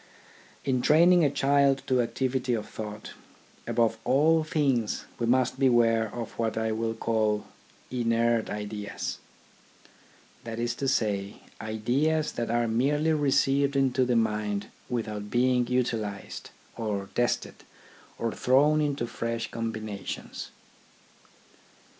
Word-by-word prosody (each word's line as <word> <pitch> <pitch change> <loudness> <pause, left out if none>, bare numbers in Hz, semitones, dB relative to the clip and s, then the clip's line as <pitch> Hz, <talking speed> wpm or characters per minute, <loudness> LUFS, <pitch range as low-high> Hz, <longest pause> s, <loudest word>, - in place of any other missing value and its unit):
In 130 -2 +1
training 170 +5 +5
a 145 - +4
child 140 0 +2
to 130 -1 +2
activity 125 +1 -1
of 105 -2 -4
thought, 105 -1 -7 0.6
above 115 -1 +1
all 155 +4 +3
things 135 -8 0
we 120 - 0
must 130 +1 +2
beware 115 -4 +3
of 120 -2 -5
what 115 -1 -1
I 110 0 0
will 115 +1 -2
call 110 -2 0 0.2
" - - -29
inert 115 -2 +1
ideas 105 0 -5 0.4
" - - -28
— - - -29
that 115 -1 -6
is 120 0 0
to 135 - 0
say, 105 -6 -1 0.2
ideas 130 +9 0
that 115 -1 -3
are 120 0 +1
merely 145 +8 +2
received 140 -1 +2
into 130 -2 +2
the 125 -1 +1
mind 105 -2 0 0.2
without 105 -4 -3
being 125 0 +2
utilised, 115 -5 -2 0.3
or 100 -3 -3
tested, 120 0 -1 0.5
or 115 -1 -1
thrown 145 +6 +3
into 145 -5 -1
fresh 115 0 -4
combinations. 110 -3 -5
120 Hz, 125 wpm, -27 LUFS, 110-135 Hz, 0.6 s, training